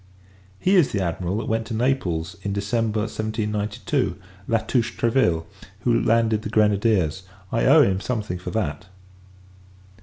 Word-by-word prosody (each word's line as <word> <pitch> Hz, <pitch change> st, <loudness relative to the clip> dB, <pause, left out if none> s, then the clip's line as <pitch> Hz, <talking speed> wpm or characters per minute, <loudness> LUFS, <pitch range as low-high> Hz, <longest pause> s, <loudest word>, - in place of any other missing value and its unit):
He 190 Hz, -, +3 dB
is 165 Hz, -6 st, +4 dB
the 100 Hz, -, -1 dB
Admiral 90 Hz, +2 st, -2 dB
that 115 Hz, -, -3 dB
went 110 Hz, 0 st, -1 dB
to 115 Hz, -, -4 dB
Naples 105 Hz, -10 st, -1 dB
in 100 Hz, -, -3 dB
December 110 Hz, +2 st, 0 dB
1792, 105 Hz, -1 st, -2 dB, 0.3 s
La 115 Hz, -, +3 dB
Touche 120 Hz, +1 st, -1 dB
Treville, 115 Hz, -9 st, +2 dB, 0.4 s
who 120 Hz, -2 st, +2 dB
landed 115 Hz, -1 st, +2 dB
the 105 Hz, -, -5 dB
grenadiers. 105 Hz, -5 st, +2 dB, 0.3 s
I 115 Hz, -, +1 dB
owe 150 Hz, +3 st, +7 dB
him 95 Hz, -5 st, +1 dB
something 105 Hz, -8 st, -3 dB
for 90 Hz, -, -6 dB
that. 95 Hz, -5 st, -3 dB
110 Hz, 145 wpm, -23 LUFS, 100-115 Hz, 0.4 s, owe